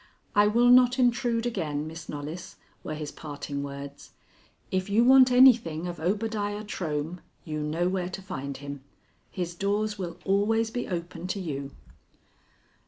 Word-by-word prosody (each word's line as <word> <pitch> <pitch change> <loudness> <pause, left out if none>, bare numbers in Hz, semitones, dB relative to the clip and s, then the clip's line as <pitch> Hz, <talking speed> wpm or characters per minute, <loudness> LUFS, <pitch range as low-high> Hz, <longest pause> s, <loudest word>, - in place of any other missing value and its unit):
"I 205 0 +5
will 240 +3 +4
not 250 0 +6
intrude 240 -2 +2
again, 155 -10 -2
Miss 165 +2 -9
Knollys," 150 +4 -6 0.3
were 155 - -4
his 150 -1 -5
parting 145 -2 -6
words. 140 0 -8 0.6
"If 185 +1 -1
you 215 +4 +4
want 260 0 +7
anything 235 -11 +5
of 175 -1 -5
Obadiah 205 +3 -1
Trohm, 165 -4 -3 0.3
you 155 -1 -3
know 155 +4 0
where 180 -1 -1
to 185 - -6
find 140 -6 -5
him. 140 -1 -7 0.5
His 175 -3 -4
doors 205 +3 -1
will 175 -2 -5
always 220 +3 +2
be 245 - -3
open 175 -1 -5
to 195 - -2
you." 140 -6 -5
180 Hz, 150 wpm, -27 LUFS, 155-220 Hz, 0.6 s, want